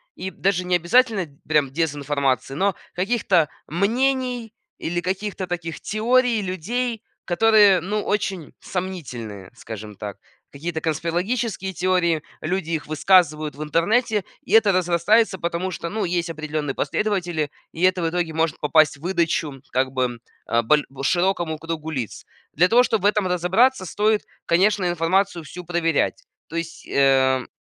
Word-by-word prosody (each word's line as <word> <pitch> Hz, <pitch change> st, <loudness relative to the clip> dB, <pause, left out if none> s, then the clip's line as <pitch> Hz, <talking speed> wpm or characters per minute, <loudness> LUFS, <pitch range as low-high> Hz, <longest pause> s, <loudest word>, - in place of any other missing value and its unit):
И 190 Hz, +1 st, -5 dB
даже 185 Hz, +1 st, 0 dB
необязательно 185 Hz, +3 st, +2 dB, 0.2 s
прям 150 Hz, -3 st, +2 dB
дезинформации, 140 Hz, -4 st, -1 dB
но 195 Hz, +5 st, +1 dB, 0.2 s
каких-то 190 Hz, -5 st, +2 dB, 0.2 s
мнений 245 Hz, -, 0 dB, 0.2 s
или 175 Hz, +1 st, -2 dB
каких-то 190 Hz, +1 st, -3 dB
таких 170 Hz, -2 st, -5 dB
теорий 235 Hz, +1 st, +2 dB
людей, 225 Hz, +6 st, -3 dB, 0.2 s
которые 205 Hz, 0 st, +5 dB
ну 210 Hz, +3 st, -2 dB
очень 195 Hz, -5 st, -2 dB
сомнительные, 125 Hz, -, -6 dB
скажем 110 Hz, -2 st, -8 dB
так. 100 Hz, 0 st, -7 dB, 0.3 s
Какие-то 160 Hz, +3 st, -4 dB
конспирологические 190 Hz, -, -2 dB
теории, 170 Hz, -2 st, +1 dB, 0.2 s
люди 175 Hz, +1 st, -2 dB
их 160 Hz, -3 st, -2 dB
высказывают 155 Hz, -2 st, +3 dB
в 150 Hz, -, -5 dB
интернете. 205 Hz, -, +1 dB, 0.2 s
И -, -, -6 dB
это 220 Hz, -3 st, +6 dB
разрастается, 185 Hz, +4 st, +2 dB
потому 170 Hz, +2 st, -2 dB
что, 170 Hz, -1 st, -5 dB
ну, 215 Hz, +1 st, -2 dB
есть 175 Hz, -1 st, -1 dB
определенные 155 Hz, -3 st, -3 dB
последователи, 175 Hz, -8 st, -1 dB, 0.2 s
и 165 Hz, -, -7 dB
это 185 Hz, -1 st, +3 dB
в 165 Hz, -, +1 dB
итоге 170 Hz, -2 st, -2 dB
может 160 Hz, -1 st, 0 dB
попасть 150 Hz, -1 st, +4 dB
в 140 Hz, -, -19 dB
выдачу, 165 Hz, -6 st, -1 dB
как 130 Hz, 0 st, +1 dB
бы, 125 Hz, -2 st, -1 dB, 0.3 s
а, 115 Hz, 0 st, +2 dB
боль 150 Hz, +6 st, +3 dB, 0.2 s
широкому 175 Hz, +1 st, +1 dB
кругу 160 Hz, -1 st, -5 dB
лиц. 130 Hz, -9 st, -5 dB, 0.3 s
Для 180 Hz, +5 st, +4 dB
того, 245 Hz, +2 st, +6 dB
чтоб 225 Hz, -4 st, 0 dB
в 200 Hz, -, -3 dB
этом 205 Hz, -2 st, +2 dB
разобраться, 185 Hz, +6 st, +2 dB
стоит, 210 Hz, +4 st, +1 dB, 0.2 s
конечно, 190 Hz, +2 st, +3 dB
информацию 175 Hz, +1 st, +1 dB
всю 175 Hz, +5 st, -9 dB
проверять. 165 Hz, -2 st, 0 dB, 0.2 s
То 165 Hz, -, -10 dB
есть 165 Hz, 0 st, -5 dB
эм 130 Hz, -2 st, +3 dB
175 Hz, 140 wpm, -23 LUFS, 155-200 Hz, 0.3 s, это